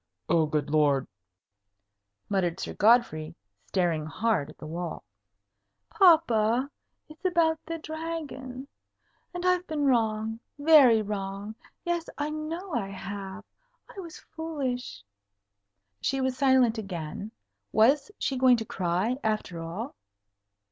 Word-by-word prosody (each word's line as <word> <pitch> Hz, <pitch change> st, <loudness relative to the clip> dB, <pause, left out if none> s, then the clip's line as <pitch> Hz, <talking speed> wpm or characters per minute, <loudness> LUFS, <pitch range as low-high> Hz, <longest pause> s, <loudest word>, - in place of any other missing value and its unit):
"Oh, 165 Hz, -2 st, +3 dB
good 150 Hz, -1 st, -1 dB
Lord!" 145 Hz, -3 st, +3 dB, 1.2 s
muttered 185 Hz, -3 st, 0 dB
Sir -, -, -4 dB
Godfrey, 210 Hz, -8 st, +3 dB, 0.3 s
staring 170 Hz, -5 st, 0 dB
hard 180 Hz, -3 st, 0 dB
at 155 Hz, -, -13 dB
the -, -, -10 dB
wall. 170 Hz, +1 st, -5 dB, 0.9 s
"Papa 260 Hz, -, +4 dB, 0.4 s
it's 310 Hz, +3 st, -15 dB
about 335 Hz, -3 st, +2 dB
the 330 Hz, 0 st, -3 dB
Dragon 310 Hz, -5 st, -6 dB, 0.6 s
and 355 Hz, 0 st, -5 dB
I've 365 Hz, 0 st, +2 dB
been 300 Hz, -2 st, -1 dB
wrong. 225 Hz, -3 st, +1 dB, 0.2 s
Very 285 Hz, -7 st, +6 dB
wrong. 200 Hz, 0 st, -4 dB, 0.3 s
Yes; 345 Hz, -1 st, -1 dB
I 295 Hz, +1 st, -2 dB
know 325 Hz, +4 st, -5 dB
I 195 Hz, -, -1 dB
have. 195 Hz, +1 st, -7 dB, 0.5 s
I -, -, -7 dB
was 335 Hz, -4 st, -8 dB
foolish." 265 Hz, -, -5 dB, 1.0 s
She 270 Hz, +1 st, 0 dB
was 260 Hz, -1 st, 0 dB
silent 260 Hz, -4 st, +3 dB
again. 185 Hz, 0 st, -6 dB, 0.4 s
Was 270 Hz, -, +4 dB
she 265 Hz, -2 st, -1 dB
going 255 Hz, -1 st, +6 dB
to 225 Hz, -, -4 dB
cry, 190 Hz, +6 st, -1 dB
after 215 Hz, -6 st, -2 dB
all? 190 Hz, -, -5 dB
230 Hz, 120 wpm, -28 LUFS, 195-305 Hz, 1.2 s, Very